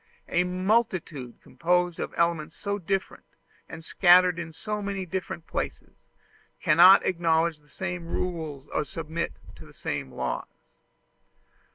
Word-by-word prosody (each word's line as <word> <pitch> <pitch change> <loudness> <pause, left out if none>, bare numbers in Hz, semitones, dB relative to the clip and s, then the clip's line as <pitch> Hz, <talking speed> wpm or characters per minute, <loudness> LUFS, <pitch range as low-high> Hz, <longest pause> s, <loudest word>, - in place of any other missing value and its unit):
A 180 - +2
multitude 180 - -1
composed 175 0 0
of - - -3
elements 170 -2 0
so 200 0 -3
different, 195 +1 -3 0.5
and 160 0 -9
scattered 180 -1 +5
in 165 -1 -5
so 210 +6 -4
many 200 -2 -3
different 180 -1 -5
places, - - -6 0.5
cannot 175 +5 +7
acknowledge 165 -2 +1
the 150 0 -27
same 175 +2 -5
rules 160 -6 -4
or - - +1
submit 160 +2 -4 0.2
to - - -12
the - - -16
same 65 - -4
laws. - - -3
170 Hz, 130 wpm, -27 LUFS, 160-185 Hz, 0.5 s, cannot